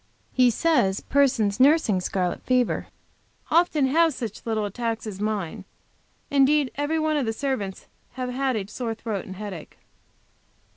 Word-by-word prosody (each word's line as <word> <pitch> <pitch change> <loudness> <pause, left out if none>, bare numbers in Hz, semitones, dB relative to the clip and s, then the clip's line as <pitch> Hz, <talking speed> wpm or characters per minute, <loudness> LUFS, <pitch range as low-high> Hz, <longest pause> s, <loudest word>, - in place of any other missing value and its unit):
He 255 -1 +5
says 230 -7 +2
persons 250 -7 +2
nursing 265 - +4
scarlet 180 0 -1
fever 250 -2 +1 0.6
often 320 -3 +3
have 320 +2 +3
such 225 -5 -6
little 220 -2 0
attacks 225 +2 -3
as 205 -2 -6
mine; 210 -6 -2 0.7
indeed 280 0 +3
every 290 +3 -1
one 310 -1 +1
of 270 -5 -1
the 225 - 0
servants 220 -7 -3 0.3
have 255 -1 -4
had 265 0 0
a 205 -3 -2
sore 225 +1 -4
throat 215 -3 -4
and 190 - -8
headache. 195 -5 -8
245 Hz, 145 wpm, -25 LUFS, 210-280 Hz, 0.7 s, He